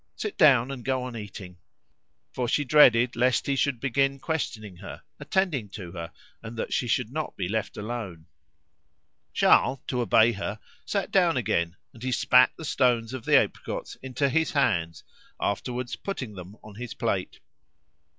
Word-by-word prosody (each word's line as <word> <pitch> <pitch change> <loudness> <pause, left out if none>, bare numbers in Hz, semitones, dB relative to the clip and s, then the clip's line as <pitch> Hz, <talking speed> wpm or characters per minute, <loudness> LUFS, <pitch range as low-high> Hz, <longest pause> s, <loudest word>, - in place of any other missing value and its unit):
Sit 425 - -4
down 135 - +5
and 130 -3 -7
go 130 0 -1
on 125 -1 -6
eating." 95 -4 -9 0.8
For 125 -1 -2
she 145 - +1
dreaded 125 -4 +5
lest 125 +2 +2
he 140 - 0
should 135 -2 0
begin 135 +2 +1
questioning 110 - -4
her, - - -10 0.2
attending 155 - -1
to 90 -5 -8
her, 85 -2 -7 0.3
that 115 0 -5
she 125 - 0
should 120 -1 0
not 155 +2 -4
be 95 - -2
left 110 +2 -3
alone. 105 -7 -6 1.1
Charles, 130 - +4
to 125 -2 -1
obey 115 0 +5
her, 105 0 -5 0.3
sat 200 -2 -2
down 175 -6 +3
again, 90 -7 0 0.2
and 115 - -15
he 130 +1 -2
spat 125 0 +5
the 160 - -7
stones 120 -4 +1
of 130 -3 -6
the - - +6
apricots - - -2
into 130 +2 -1
his 160 +4 0
hands, 85 - 0 0.4
afterwards 120 +4 -2
putting 130 - -5
them 95 +2 -10
on 105 - -12
his 120 +3 -7
plate. - - -2
120 Hz, 160 wpm, -26 LUFS, 105-135 Hz, 1.1 s, the